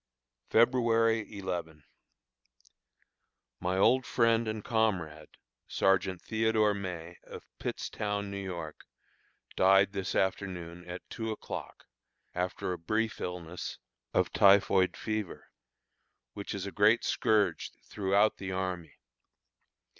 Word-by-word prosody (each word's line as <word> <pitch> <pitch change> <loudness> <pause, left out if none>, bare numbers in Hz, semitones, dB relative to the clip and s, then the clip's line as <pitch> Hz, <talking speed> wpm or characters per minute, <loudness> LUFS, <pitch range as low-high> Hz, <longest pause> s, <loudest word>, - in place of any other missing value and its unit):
February 115 -2 +3
11. 85 -5 -5 1.8
My 90 +1 -1
old 130 +7 +4
friend 115 -2 +2
and 110 -1 -3
comrade, 95 -9 0 0.4
Sergeant 95 -2 +1
Theodore 110 -1 +2
May, 90 -4 -6
of - - -10
Pittstown, 100 -1 -3
New 100 0 -4
York, 85 -5 -7 0.7
died 95 +1 +5
this 95 -1 -3
afternoon 90 -3 -2
at 90 +1 -7
two 110 -1 -4
o'clock, 110 - -6 0.5
after 90 0 -2
a 90 - -6
brief 110 +6 -1
illness, 90 -1 -5 0.3
of - - +1
typhoid 95 -1 +5
fever, 110 -3 -4 0.8
which 100 0 -5
is 100 -1 -4
a 100 - -5
great 105 +4 +4
scourge 105 -2 +1
throughout 100 +2 +2
the 95 -1 -5
army. 90 -4 -3
100 Hz, 105 wpm, -30 LUFS, 90-110 Hz, 1.8 s, died